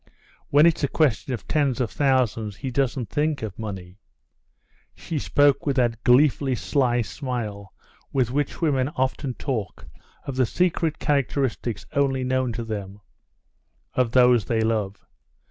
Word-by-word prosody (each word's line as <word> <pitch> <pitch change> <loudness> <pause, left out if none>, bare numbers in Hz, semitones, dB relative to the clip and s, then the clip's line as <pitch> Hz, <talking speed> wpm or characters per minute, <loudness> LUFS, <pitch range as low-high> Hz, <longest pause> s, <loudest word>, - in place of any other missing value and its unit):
When 145 +2 +6
it's 165 -3 +2
a - - +3
question 135 -3 +1
of 120 - -5
tens 140 -5 +1
of 120 -6 -1
thousands, 115 -3 +1
he 130 +4 -5
doesn't 130 -2 -1
think 150 -3 0
of 105 -3 -6
money." 95 -3 -7 1.0
She 160 - -4
spoke 145 +1 +2
with 140 - +1
that 120 -3 0
gleefully 135 +1 +4
sly 125 -2 +1
smile 110 -6 -5 0.4
with 125 -3 +1
which 145 +5 -2
women 135 -4 +2
often 130 0 -1
talk 120 -8 -4 0.4
of 135 -2 -5
the 130 -2 +3
secret 165 0 0
characteristics 135 -4 -1
only 135 -2 +1
known 130 -1 0
to 115 - -4
them—of 100 - -7
those 125 -3 +5
they 115 -1 0
love. 110 -3 -1
125 Hz, 140 wpm, -24 LUFS, 110-140 Hz, 1.0 s, When